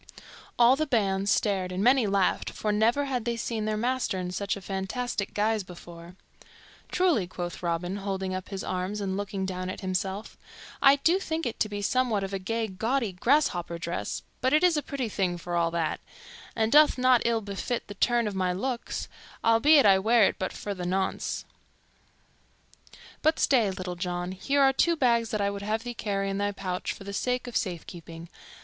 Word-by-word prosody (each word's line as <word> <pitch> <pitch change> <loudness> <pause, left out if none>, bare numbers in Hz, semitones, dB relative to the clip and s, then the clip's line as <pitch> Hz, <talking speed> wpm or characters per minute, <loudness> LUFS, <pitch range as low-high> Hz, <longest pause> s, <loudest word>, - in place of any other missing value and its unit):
All 240 +2 +6
the 310 +2 -1
band 200 -6 +1
stared 195 -4 +1
and 185 +2 -2
many 250 -1 +4
laughed, 195 -1 +1
for 210 - -2
never 230 +7 +2
had 255 -4 -2
they 235 0 -2
seen 225 -2 -2
their 215 0 -1
master 245 -3 0
in 180 -1 -3
such 200 +2 -2
a - - -7
fantastic 200 +3 -3
guise 215 0 +1
before. 175 -1 -12 0.8
"Truly," 340 - +2
quoth 175 -1 -6
Robin, 175 +2 -2
holding 190 -1 -3
up 185 0 -5
his 195 -1 -5
arms 185 +3 -3
and 195 -2 -2
looking 200 -1 -3
down 185 -1 -4
at - - -6
himself, 190 +2 -3 0.4
"I 275 0 +7
do 330 +7 +2
think 325 -4 -3
it 240 - 0
be 205 0 -4
somewhat 235 -3 +1
of 195 0 -5
a 195 - -1
gay, 225 +4 -2
gaudy, 225 +4 -1
grasshopper 180 - +1
dress; 170 0 -4 0.2
but 260 +2 +2
it 305 - +4
is 355 -2 +5
a 295 - +1
pretty 275 -4 -3
thing 185 -4 -1
for 175 +1 -5
all 170 -1 +2
that, 165 -1 -1 0.6
and 220 -1 +1
doth 300 -1 +6
not 255 -1 +4
ill 230 -1 +1
befit 205 +4 -3
the 205 - -7
turn 235 +2 +2
of 210 - -3
my 185 -1 0
looks, 240 +6 -3 0.4
albeit 265 +6 +6
I 195 -2 +6
wear 225 +3 +4
it - - +2
but 185 - -2
for 205 - -5
the 185 -2 -6
nonce. 190 +2 -2 1.8
But 315 +1 +3
stay, 235 -7 +3
Little 185 -1 -5
John, 175 0 -3
here 275 +10 0
are 270 0 +5
two 335 +5 +3
bags 235 -5 +2
that 215 -2 -1
I 200 0 +1
would 200 0 -6
have 215 +2 -2
thee 245 -1 -5
carry 200 -3 -2
in 195 0 -2
thy 205 0 0
pouch 185 -2 -3
for - - -9
the 200 0 -7
sake 250 +5 -1
of 245 - -8
safekeeping. 170 -2 -5
205 Hz, 195 wpm, -27 LUFS, 185-240 Hz, 1.8 s, I